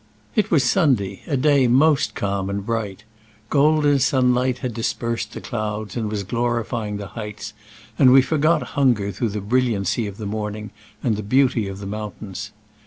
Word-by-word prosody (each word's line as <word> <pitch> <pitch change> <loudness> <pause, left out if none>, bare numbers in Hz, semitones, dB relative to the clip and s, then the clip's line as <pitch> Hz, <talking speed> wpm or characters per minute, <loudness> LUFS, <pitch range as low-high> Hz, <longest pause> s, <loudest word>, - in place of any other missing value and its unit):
It 215 -2 +2
was 150 -6 +3
Sunday, 120 - +1
a 140 - 0
day 140 -1 +4
most 140 +4 +3
calm 100 -1 -2
and 100 0 -3
bright. 105 -3 -3 0.5
Golden 145 0 +4
sunlight 125 -1 +2
had 125 -2 -4
dispersed 115 +1 -3
the - - -7
clouds 110 -3 -4
and 110 -3 -2
was 105 -1 -3
glorifying 115 -1 -2
the 100 -1 -7
heights, 105 -1 -7 0.5
and 130 -2 +7
we 130 0 +7
forgot 155 +3 +2
hunger 120 -8 +2
through 110 +4 -2
the 105 0 -4
bril 125 +5 +1
liancy 100 +2 -1
of 100 - -11
the 110 - -6
morning 105 0 -4 0.3
and 105 -3 -1
beauty 130 -5 +3
of 95 0 -6
the 100 - -8
mountains. 105 -1 -6
115 Hz, 170 wpm, -22 LUFS, 105-130 Hz, 0.5 s, and